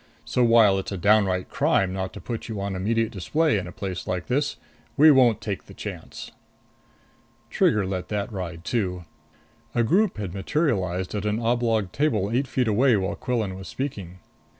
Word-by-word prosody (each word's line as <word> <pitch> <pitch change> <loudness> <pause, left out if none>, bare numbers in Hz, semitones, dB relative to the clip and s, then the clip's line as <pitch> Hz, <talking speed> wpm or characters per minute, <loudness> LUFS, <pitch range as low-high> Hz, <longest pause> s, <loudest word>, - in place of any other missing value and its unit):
So 125 - +1
while 115 -4 +5
it's 95 - -6
a 100 - -3
downright 95 -1 +2
crime 95 -1 +1
not 95 -1 -3
to - - -8
put 115 -1 -6
you 110 -3 -4
on 100 -1 -3
immediate 110 +4 0
display 140 - +1
in 90 - -6
a - - -7
place 95 -1 -5
like 90 -1 -2
this, 145 +4 -1 0.4
we 155 +2 +8
won't 125 -5 +4
take 100 -3 -4
the - - -14
chance." - - -8 1.2
Trigger 105 -2 +2
let 95 -1 -3
that 105 +2 -3
ride 85 -3 -5
too. 90 -7 -2 0.7
A 120 - +3
group 190 - +2
had 100 -4 -4
materialized 95 - -1
at 105 0 -2
an 105 +1 0
oblong 115 -4 +1
table 110 - 0
eight 130 +3 +1
feet 125 -1 0
away 115 +2 +4
while 95 -1 -2
Quillan 110 -7 -2
was 95 0 -9
speaking. 100 -10 -5
105 Hz, 175 wpm, -25 LUFS, 95-120 Hz, 1.2 s, we